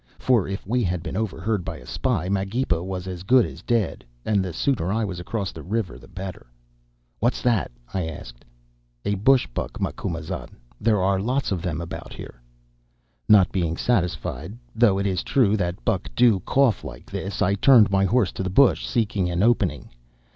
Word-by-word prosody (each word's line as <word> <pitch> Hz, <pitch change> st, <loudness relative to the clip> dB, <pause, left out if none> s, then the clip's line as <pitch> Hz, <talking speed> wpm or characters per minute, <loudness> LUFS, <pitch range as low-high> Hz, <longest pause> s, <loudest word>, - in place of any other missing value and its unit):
For 120 Hz, -7 st, +2 dB
if 95 Hz, 0 st, -5 dB
we 120 Hz, +4 st, 0 dB
had 90 Hz, -2 st, -1 dB
been 80 Hz, +2 st, -5 dB
overheard 105 Hz, -1 st, -1 dB
by -, -, -5 dB
a -, -, -13 dB
spy, 105 Hz, -10 st, -1 dB
Magepa 95 Hz, -1 st, 0 dB
was 95 Hz, -1 st, -4 dB
as 90 Hz, -2 st, -6 dB
good 120 Hz, +5 st, +4 dB
as -, -, -9 dB
dead, 115 Hz, -4 st, -1 dB, 0.2 s
and 100 Hz, -3 st, +2 dB
the 90 Hz, -, -4 dB
sooner 95 Hz, -, 0 dB
I 110 Hz, +1 st, 0 dB
was 95 Hz, -3 st, -5 dB
across 95 Hz, +1 st, -3 dB
the -, -, -9 dB
river 95 Hz, -, -3 dB
the -, -, -15 dB
better. 95 Hz, -6 st, -8 dB, 0.7 s
"'What's 120 Hz, +3 st, 0 dB
that?' 115 Hz, -, +2 dB, 0.2 s
I 95 Hz, -4 st, -1 dB
asked. -, -, -9 dB, 0.6 s
"'A 100 Hz, -, +1 dB
bush 120 Hz, +6 st, +4 dB
buck, -, -, -4 dB
Macumazahn. 80 Hz, -1 st, -4 dB, 0.2 s
There 110 Hz, -2 st, +2 dB
are 95 Hz, 0 st, +2 dB
lots 125 Hz, +6 st, -1 dB
of 90 Hz, -4 st, -1 dB
them 85 Hz, -3 st, -3 dB
about 85 Hz, 0 st, -7 dB
here.' -, -, -10 dB, 0.9 s
"Not 100 Hz, -4 st, +6 dB
being 85 Hz, -4 st, -1 dB
satisfied, 90 Hz, -, -1 dB, 0.2 s
though 110 Hz, -4 st, +4 dB
it 100 Hz, -, -1 dB
is 95 Hz, -3 st, 0 dB
true 110 Hz, -6 st, +2 dB
that 85 Hz, -, -3 dB
buck -, -, 0 dB
do 115 Hz, -6 st, +5 dB
cough 135 Hz, -6 st, +3 dB
like -, -, -9 dB
this, 95 Hz, 0 st, -2 dB
I 100 Hz, -, +2 dB
turned 110 Hz, 0 st, +6 dB
my 95 Hz, 0 st, +3 dB
horse 105 Hz, 0 st, +2 dB
to -, -, -6 dB
the 95 Hz, -, -1 dB
bush, 130 Hz, +8 st, +4 dB
seeking 105 Hz, -6 st, 0 dB
an 85 Hz, +2 st, 0 dB
opening. 120 Hz, +1 st, +1 dB
95 Hz, 185 wpm, -24 LUFS, 90-115 Hz, 0.9 s, Not